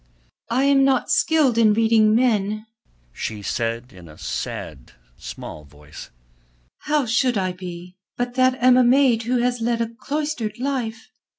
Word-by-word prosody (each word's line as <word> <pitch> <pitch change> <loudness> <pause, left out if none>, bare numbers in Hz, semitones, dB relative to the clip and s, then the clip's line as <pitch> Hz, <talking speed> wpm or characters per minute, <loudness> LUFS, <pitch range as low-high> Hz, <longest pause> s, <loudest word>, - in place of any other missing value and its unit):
"I 250 +3 +1
am 275 -1 +4
not 270 -2 +1
skilled 290 -8 +3
in 215 -2 +4
reading 220 -1 +3
men," 215 -3 +1 0.5
she 105 - -5
said 115 +3 -3
in 90 -2 -14
a 75 - -14
sad, 70 -5 -6 0.2
small 75 - -9
voice. 75 +1 -13 0.7
"How 300 -2 0
should 240 +1 +1
I 185 -1 -1
be, 180 0 -9 0.2
that 255 +1 +1
am 255 0 +4
but 250 - +5
a - - +5
maid 250 -2 +4
who 250 - +2
has 245 -1 -1
led 235 0 0
a 230 - 0
cloistered 290 -7 -3
life. 240 -4 -4
230 Hz, 155 wpm, -22 LUFS, 185-255 Hz, 0.7 s, but